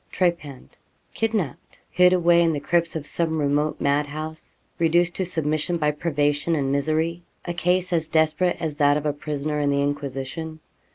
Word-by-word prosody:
Trepanned, 170 Hz, -7 st, -2 dB, 0.3 s
kidnapped, 215 Hz, -, -3 dB
hid 180 Hz, 0 st, +5 dB
away 175 Hz, -1 st, +4 dB
in 165 Hz, -1 st, +3 dB
the 145 Hz, -, -2 dB
crypts 170 Hz, +3 st, 0 dB
of 155 Hz, -2 st, -4 dB
some 160 Hz, +1 st, 0 dB
remote 145 Hz, +1 st, 0 dB
mad 145 Hz, +1 st, +1 dB
house 155 Hz, +2 st, -7 dB, 0.2 s
reduced 170 Hz, +1 st, +2 dB
to 190 Hz, -, 0 dB
submission 160 Hz, 0 st, -1 dB
by 150 Hz, -2 st, +1 dB
privation 150 Hz, 0 st, 0 dB
and 135 Hz, -3 st, 0 dB
misery 155 Hz, +4 st, 0 dB, 0.2 s
a 175 Hz, -, -3 dB
case 180 Hz, +1 st, 0 dB
as 165 Hz, -2 st, 0 dB
desperate 160 Hz, +3 st, +2 dB
as 155 Hz, -3 st, -3 dB
that 145 Hz, -1 st, +4 dB
of 150 Hz, -, -4 dB
a 150 Hz, -, +1 dB
prisoner 150 Hz, 0 st, -3 dB
in 145 Hz, -1 st, +1 dB
the 140 Hz, 0 st, +1 dB
Inquisition. 145 Hz, +3 st, -4 dB
155 Hz, 170 wpm, -24 LUFS, 145-170 Hz, 0.3 s, hid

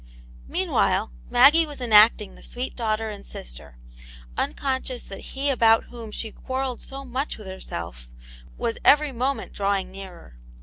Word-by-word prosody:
Meanwhile -, -, +1 dB, 0.2 s
Maggie 295 Hz, +6 st, +7 dB
was 290 Hz, -2 st, -8 dB
enacting 215 Hz, -3 st, +5 dB
the -, -, -15 dB
sweet 250 Hz, +1 st, -5 dB
daugh 220 Hz, -3 st, 0 dB
ter 220 Hz, 0 st, -4 dB
and 200 Hz, -1 st, -9 dB
sister, -, -, -9 dB, 0.6 s
unconscious 260 Hz, -, -2 dB
that 195 Hz, -, -9 dB
he 280 Hz, +1 st, +2 dB
about 225 Hz, -3 st, +4 dB
whom 235 Hz, -3 st, -8 dB
she 220 Hz, +1 st, -4 dB
quarrelled 260 Hz, 0 st, -4 dB
so 275 Hz, 0 st, -7 dB
much 260 Hz, +3 st, -3 dB
with 215 Hz, -, -11 dB
herself 85 Hz, -, -7 dB, 0.5 s
was 230 Hz, -, -2 dB
every 295 Hz, 0 st, +5 dB
moment 260 Hz, +2 st, -2 dB
drawing 195 Hz, -2 st, -1 dB
nearer. 185 Hz, -, -11 dB
230 Hz, 145 wpm, -24 LUFS, 195-265 Hz, 0.6 s, Maggie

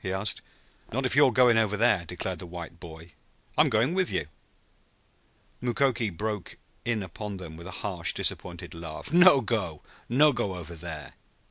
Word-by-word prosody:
he 95 Hz, -, -2 dB
asked. 95 Hz, 0 st, -1 dB, 0.5 s
"Not 130 Hz, +4 st, -1 dB
if 130 Hz, -, +1 dB
you're 140 Hz, -2 st, +6 dB
going 120 Hz, -1 st, +5 dB
over 105 Hz, -2 st, +1 dB
there!" 105 Hz, -5 st, +3 dB
declared 90 Hz, +1 st, -4 dB
the 90 Hz, -, -8 dB
white 85 Hz, -1 st, -8 dB
boy. 80 Hz, 0 st, -11 dB, 0.4 s
"I'm -, -, +5 dB
going 115 Hz, +9 st, +2 dB
with 185 Hz, -1 st, +2 dB
you." -, -, -1 dB, 1.4 s
Mukoki 120 Hz, -2 st, +1 dB
broke 105 Hz, +2 st, -4 dB, 0.3 s
in 115 Hz, -3 st, -1 dB
upon 100 Hz, +3 st, -6 dB
them 85 Hz, -4 st, -8 dB
with 85 Hz, +2 st, -10 dB
a 90 Hz, -, -7 dB
harsh 90 Hz, -5 st, +1 dB
disappointed -, -, -2 dB
laugh. 80 Hz, -, -7 dB
"No 175 Hz, -5 st, +8 dB
go. 100 Hz, -9 st, -2 dB, 0.3 s
No 145 Hz, +5 st, +5 dB
go 105 Hz, -6 st, -2 dB
over 85 Hz, -1 st, -8 dB
there." 80 Hz, -3 st, -7 dB
100 Hz, 165 wpm, -28 LUFS, 85-120 Hz, 1.4 s, No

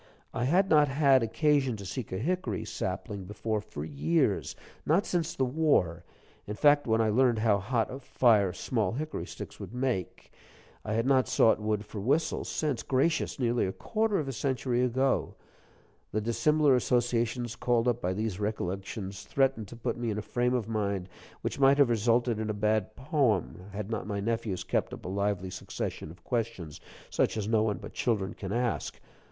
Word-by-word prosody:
I 120 Hz, -, -1 dB
had 180 Hz, +8 st, +3 dB
not 150 Hz, -4 st, +5 dB
had 135 Hz, -1 st, +4 dB
occasion 135 Hz, +1 st, +1 dB
to 100 Hz, -, -8 dB
seek 120 Hz, +4 st, -5 dB
a 95 Hz, -, -2 dB
hickory 150 Hz, -, -2 dB
sapling 100 Hz, -2 st, -4 dB
before 105 Hz, +2 st, -2 dB
for 75 Hz, -7 st, -7 dB
years; 80 Hz, +2 st, 0 dB, 0.3 s
not 170 Hz, +7 st, +2 dB
since 170 Hz, -2 st, -1 dB
the 130 Hz, -, +1 dB
war, 125 Hz, -, +1 dB, 0.4 s
in 105 Hz, -, -4 dB
fact, 145 Hz, +2 st, +4 dB
when 110 Hz, 0 st, +2 dB
I 110 Hz, -1 st, +3 dB
learned 120 Hz, +1 st, +3 dB
how 110 Hz, -2 st, +3 dB
hot 115 Hz, +3 st, -1 dB
a 135 Hz, -, -6 dB
fire 110 Hz, -7 st, +3 dB
small 105 Hz, +2 st, -1 dB
hickory 155 Hz, +5 st, -4 dB
sticks -, -, -9 dB
would 100 Hz, +4 st, -8 dB
make. 125 Hz, -8 st, -3 dB, 0.5 s
I 110 Hz, -, -3 dB
had 115 Hz, +2 st, +1 dB
not 130 Hz, -1 st, +3 dB
sought 120 Hz, -4 st, +4 dB
wood 105 Hz, -1 st, -1 dB
for 105 Hz, 0 st, -7 dB
whistles 150 Hz, +8 st, 0 dB
since 145 Hz, -7 st, -1 dB
gracious, 140 Hz, +5 st, 0 dB
nearly 120 Hz, -5 st, +1 dB
a -, -, -2 dB
quarter 215 Hz, -, 0 dB
of 150 Hz, -, -2 dB
a -, -, -2 dB
century 130 Hz, -1 st, 0 dB
ago! 130 Hz, +2 st, +1 dB, 0.8 s
The 110 Hz, -, 0 dB
dissimilar 145 Hz, +5 st, +3 dB
associations 120 Hz, -1 st, 0 dB
called 120 Hz, -1 st, +1 dB
up 120 Hz, -, +1 dB
by 90 Hz, +1 st, 0 dB
these 105 Hz, -1 st, -3 dB
recollections 100 Hz, -1 st, -4 dB
threatened 135 Hz, -6 st, +1 dB
to 120 Hz, -, -10 dB
put 115 Hz, -, -3 dB
me 120 Hz, -1 st, -2 dB
in 105 Hz, -, -2 dB
a 105 Hz, -, -3 dB
frame 125 Hz, +1 st, 0 dB
of 115 Hz, -4 st, -1 dB
mind 100 Hz, -4 st, -2 dB, 0.3 s
which -, -, -3 dB
might 135 Hz, 0 st, +6 dB
have 140 Hz, -4 st, +5 dB
resulted 115 Hz, +1 st, +2 dB
in 110 Hz, 0 st, -2 dB
a 105 Hz, -, -1 dB
bad 105 Hz, 0 st, 0 dB
poem, 130 Hz, -, 0 dB
had 105 Hz, +2 st, -5 dB
not 110 Hz, -2 st, -3 dB
my 100 Hz, -2 st, -2 dB
nephews 110 Hz, -3 st, -2 dB
kept -, -, -1 dB
up -, -, -15 dB
a -, -, -3 dB
lively 100 Hz, -1 st, -1 dB
succession 90 Hz, -3 st, -5 dB
of 90 Hz, +2 st, -14 dB
questions 115 Hz, -, -3 dB, 0.3 s
such -, -, +1 dB
as 105 Hz, -1 st, -2 dB
no 110 Hz, -1 st, +3 dB
one 110 Hz, -2 st, 0 dB
but -, -, -10 dB
children 100 Hz, -6 st, -1 dB
can 95 Hz, -2 st, -6 dB
ask. 120 Hz, +1 st, -1 dB
115 Hz, 185 wpm, -29 LUFS, 105-130 Hz, 0.8 s, might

